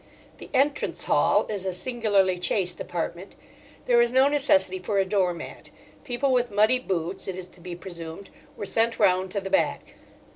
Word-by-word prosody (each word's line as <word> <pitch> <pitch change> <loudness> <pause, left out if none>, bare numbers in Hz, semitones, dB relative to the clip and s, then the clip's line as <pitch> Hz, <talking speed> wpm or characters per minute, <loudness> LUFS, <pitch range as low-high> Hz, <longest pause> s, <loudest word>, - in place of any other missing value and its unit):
The - - -10
"Entrance 280 +2 0
Hall" - - +3
is 205 -3 -4
a 190 - -1
singularly 200 -3 +1
chaste 180 -1 0
apartment. 175 +2 -5 0.5
There 240 -1 +4
is 235 0 +2
no 260 +2 +5
necessity 290 +5 +2
for 205 - -2
a 195 - +3
door 190 -2 +1
mat: 170 - -9 0.3
people 270 0 -1
with 245 -1 +2
muddy 215 +5 +3
boots, 185 -6 -3
it 190 -1 -4
is 185 -1 -7
to - - -21
be 175 0 -7
presumed, 170 0 -9 0.3
were 205 - -4
sent 230 +3 0
round 185 -2 +3
to 200 - -2
the 195 - -6
back. 290 - 0
200 Hz, 180 wpm, -25 LUFS, 180-245 Hz, 0.5 s, no